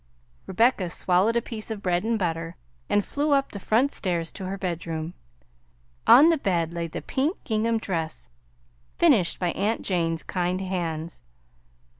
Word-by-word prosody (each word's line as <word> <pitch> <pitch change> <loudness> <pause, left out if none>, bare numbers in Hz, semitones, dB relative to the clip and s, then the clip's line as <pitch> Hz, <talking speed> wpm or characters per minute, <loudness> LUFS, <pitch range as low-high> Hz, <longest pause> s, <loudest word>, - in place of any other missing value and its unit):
Rebecca 205 -2 +2
swallowed 185 +6 +2
a 235 - +1
piece 220 -2 -3
of 215 -2 -5
bread 175 0 +1
and 230 +1 0
butter, 165 -3 -2 0.3
and 205 - +2
flew 290 +1 0
up 275 -1 +1
the 200 - -7
front 235 +8 +2
stairs 170 -4 -2
to 190 - -7
her 195 +1 -4
bedroom. 170 -3 -4 0.9
On 290 +7 +9
the 330 -3 +2
bed 170 -7 0
lay 170 -1 -3
the 160 - -7
pink 290 +7 -1
gingham 225 +1 0
dress 160 - -3 0.7
finished 175 - +4
by 180 -2 0
aunt 215 +3 -1
Jane's 165 -3 -1
kind 180 0 -1
hands. 170 - -4
185 Hz, 155 wpm, -25 LUFS, 170-225 Hz, 0.9 s, On